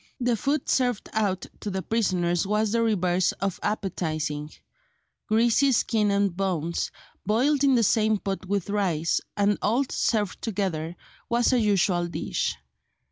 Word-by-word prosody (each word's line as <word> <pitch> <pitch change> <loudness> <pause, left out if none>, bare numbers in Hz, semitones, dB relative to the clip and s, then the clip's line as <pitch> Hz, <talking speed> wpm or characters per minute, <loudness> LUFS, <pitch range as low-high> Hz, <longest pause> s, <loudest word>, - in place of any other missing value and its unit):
The 245 -1 +1
food 280 +5 -1
served 245 -5 0
out 200 -4 0
to 210 - -4
the 190 -1 -3
prisoners 180 -5 0
was 210 +1 +1
the 230 +1 +2
reverse 185 -5 +1
of 195 -1 -3
appetising: 155 -7 -2 0.8
greasy 235 +5 +3
skin 220 -3 +2
and 200 -2 +1
bones, 175 -4 -1 0.3
boiled 265 +7 +2
in 275 -2 +5
the 235 - +3
same 215 0 +3
pot 195 -1 -4
with 200 0 -1
rice, 175 -6 0 0.2
and 205 0 +2
all 235 +6 +2
served 210 -5 0
together, 180 -6 -2 0.3
was 240 +2 +2
a 250 - +4
usual 190 -5 +2
dish. 165 -1 -2
205 Hz, 140 wpm, -26 LUFS, 180-225 Hz, 0.8 s, in